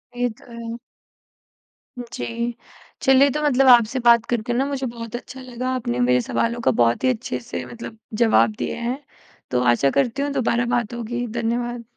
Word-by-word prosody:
ये 245 0 0
तो - - -18
है। 230 0 -6 1.2
जी, 235 0 -4 0.5
चलिए 270 +1 +5
तो 300 - -2
मतलब 270 -2 +3
आपसे 240 +1 +5
बात 235 -1 +6
करके 240 0 -1
ना 265 +3 +1
मुझे 275 -2 -3
बहुत 230 0 -7
अच्छा 260 +2 -8
लगा। 255 0 -5
आपने 125 - -2
मेरे 125 0 +3
सवालों 235 - -1
का - - +3
बहुत 115 0 +2
ही 260 - +4
अच्छे 245 -1 -2
से 235 - -6
मतलब 230 -1 -9 0.3
जवाब 220 -1 +4
दिए - - -2
हैं, 240 +3 -3 0.5
तो 125 - +1
आशा 120 +3 +3
करती 270 - 0
हूँ 285 0 -1
दोबारा 240 -3 +1
बात 235 -1 -1
होगी। 240 +1 -3
धन्यवाद। 235 +1 -2
240 Hz, 175 wpm, -22 LUFS, 230-255 Hz, 1.2 s, बात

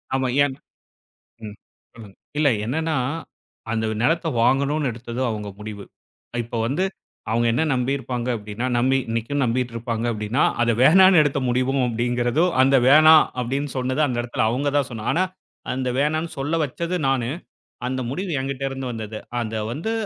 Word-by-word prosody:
ஆமா. 130 -1 0 0.2
ஏன்? 135 -2 -1 0.9
ம். 105 -1 -7 0.4
சொல்லுங்க. 105 -4 -12 0.2
இல்ல 150 -2 +4 0.2
என்னன்னா, 160 +4 -1 0.8
அந்த 110 -1 -1 0.2
நிலத்த 165 +5 +1 0.2
வாங்கணும்னு 140 +2 +2
எடுத்ததோ 120 +2 -5
அவங்க 105 -2 -4
முடிவு. 105 -1 -7 0.6
இப்ப 120 0 -6
வந்து 155 +10 0 0.5
அவங்க 115 +1 +2
என்ன 125 +7 +1
நம்பி 125 +1 0
இருப்பாங்க 125 -2 -4
அப்டின்னா, 105 +3 -5
நம்பி 130 +2 +3
இன்னைக்கும் 115 +5 -1
நம்பிட்டு 120 0 -1
இருப்பாங்க 115 0 -3
அப்டின்னா, 110 +5 -1 0.2
அத 120 - +2
வேணாம்னு 185 +3 +7
எடுத்த 145 -1 0
முடிவும் 130 +2 +1
அப்டிங்கிறது, 120 +5 0 0.2
அந்த 135 +1 +4
வேணாம் 155 +2 +8 0.2
அப்டின்னு 135 +3 -2
சொன்னது 130 +3 -1
அந்த 120 -2 -1
எடத்துல 120 -2 -1
அவங்க 140 +4 0
தான் 140 - -1
சொன்னா, 115 -1 -6
ஆனா 180 +3 +2 0.5
அந்த 130 0 -2
வேணான்னு 155 +3 0
சொல்ல 145 +4 -1
வச்சது 170 +6 -3
நானு. 130 -3 0 0.6
அந்த 130 +1 -2
முடிவு 185 +6 -4
என்கிட்ட 135 0 -4
இருந்து 135 0 -5
வந்தது. 110 -1 -6 0.2
அத 110 -1 -4 0.2
வந்து, 170 - -3
130 Hz, 155 wpm, -22 LUFS, 115-145 Hz, 0.9 s, வேணாம்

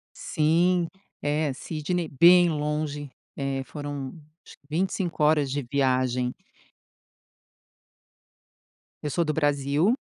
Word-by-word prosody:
Sim. 170 +3 +2 0.3
É, 150 0 0
Sydney, 160 +5 -3
bem 175 +5 +6
longe. 150 -1 -2 0.3
É, 135 -1 -2
foram, 145 -2 -6 0.3
acho - - -13
que 140 - -32
25 175 0 -1
horas 150 -2 +3
de 145 +1 -2
viagem. 130 -2 +1 2.7
Eu 150 - -1
sou 170 +4 +1
do 155 -2 -1
Brasil, 145 - +2
150 Hz, 100 wpm, -26 LUFS, 140-165 Hz, 2.7 s, bem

